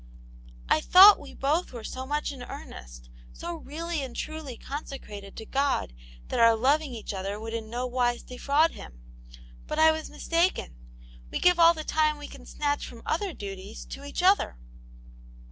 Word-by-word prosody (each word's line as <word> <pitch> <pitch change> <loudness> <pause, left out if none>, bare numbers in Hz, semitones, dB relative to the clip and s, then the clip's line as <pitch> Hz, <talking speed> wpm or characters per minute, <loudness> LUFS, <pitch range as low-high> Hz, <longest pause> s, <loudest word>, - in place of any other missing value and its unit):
" - - -21 0.3
I 155 - +3
thought 390 - +9
we - - -11
both 305 +6 0
were 235 -2 -7
so 260 +4 -6
much 295 +1 -1
in 270 -3 -9
earnest, - - -10 0.2
so 345 0 -6
really 325 +1 -4
and 260 -3 -6
truly 310 -6 -5
consecrated 215 -9 -8
to 220 - -7
God 275 - 0 0.3
tbat - - -2
our 230 -1 +6
loving 275 +3 +1
each 220 -2 -6
other 195 +2 -4
would 225 +1 -6
in 225 -1 -4
no 245 +2 -3
wise 245 -1 0
defraud 285 +6 +1
Him, - - -12 0.7
But 305 - -3
I 315 0 +7
was 315 0 -4
mistaken. 335 - 0 0.5
We - - -3
give 360 -1 +4
all 335 0 +7
the 310 - -5
time 305 -1 +1
we 290 0 -8
can - - -13
snatch 290 -1 -2
from 230 - -12
other 380 +4 -1
duties, 200 - -8
to 275 - -7
each 285 +5 -4
other." 380 - +3
275 Hz, 180 wpm, -27 LUFS, 225-315 Hz, 0.7 s, thought